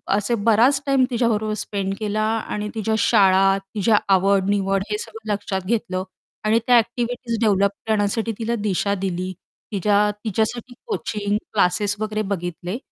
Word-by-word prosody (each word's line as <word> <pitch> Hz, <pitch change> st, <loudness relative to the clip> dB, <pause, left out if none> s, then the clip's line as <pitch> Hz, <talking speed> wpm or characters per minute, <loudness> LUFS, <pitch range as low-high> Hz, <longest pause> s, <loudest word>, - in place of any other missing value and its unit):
असे 210 Hz, +4 st, 0 dB
बराच 230 Hz, +6 st, +3 dB
time 275 Hz, -2 st, +3 dB
तिझ्याबरोबर 220 Hz, -3 st, 0 dB
spend 195 Hz, -2 st, -3 dB
केला 215 Hz, 0 st, -1 dB
आणि 215 Hz, -1 st, -2 dB
तिझ्या 220 Hz, 0 st, 0 dB
शाळा, 195 Hz, -3 st, +4 dB, 0.2 s
तिझ्या 215 Hz, +1 st, +3 dB, 0.2 s
आवड-निवड 195 Hz, 0 st, +2 dB
हे 210 Hz, -, 0 dB
सगळं 220 Hz, 0 st, -7 dB
लक्षात 200 Hz, -1 st, -3 dB
घेतलं 190 Hz, -3 st, -1 dB, 0.4 s
आणि 220 Hz, +2 st, +4 dB
त्या 250 Hz, -, +6 dB
ॲक्टिव्हिटीज 235 Hz, 0 st, -1 dB
डेव्हलप 200 Hz, -3 st, +3 dB, 0.2 s
करण्यासाठी 220 Hz, +1 st, 0 dB
तिला 230 Hz, +1 st, -1 dB
दिशा 200 Hz, 0 st, 0 dB
दिली, 185 Hz, -1 st, -3 dB, 0.4 s
तिच्या 205 Hz, +1 st, +2 dB, 0.2 s
तिच्यासाठी 225 Hz, +3 st, -2 dB
कोचिंग 210 Hz, -, -2 dB, 0.2 s
क्लासेस 205 Hz, +1 st, +2 dB
वगैरे 215 Hz, 0 st, -2 dB
बघितले 175 Hz, +2 st, -4 dB
210 Hz, 135 wpm, -22 LUFS, 195-225 Hz, 0.4 s, त्या